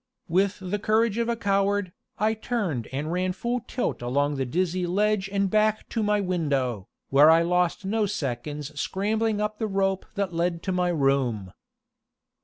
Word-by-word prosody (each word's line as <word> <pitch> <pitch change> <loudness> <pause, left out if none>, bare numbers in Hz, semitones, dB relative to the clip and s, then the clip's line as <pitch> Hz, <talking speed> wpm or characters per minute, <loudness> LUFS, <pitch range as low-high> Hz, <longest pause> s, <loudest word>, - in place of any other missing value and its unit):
With 190 +4 +1
the 190 +2 -3
courage 220 +1 +2
of 235 0 0
a 235 - +1
coward, 200 -2 +1 0.3
I 215 +2 +2
turned 205 - -2
and 145 +4 -3
ran 185 +1 0
full 240 +6 -2
tilt 250 - -2
along 140 +4 0
the 135 -2 -2
dizzy 180 +4 0
ledge 200 +1 +1
and 200 -1 +1
back 215 +2 +1
to 225 - -1
my 210 0 +2
window, 140 - -1 0.2
where 145 +3 +7
I 165 +1 +6
lost 180 +2 +1
no 215 +1 +1
seconds 145 -2 -4
scrambling 215 +4 0
up 210 0 -2
the 220 - 0
rope 195 -1 0
that 200 -3 -1
led 170 0 -1
to 190 - -1
my 180 -1 +1
room. 135 - 0
185 Hz, 170 wpm, -26 LUFS, 150-210 Hz, 0.3 s, where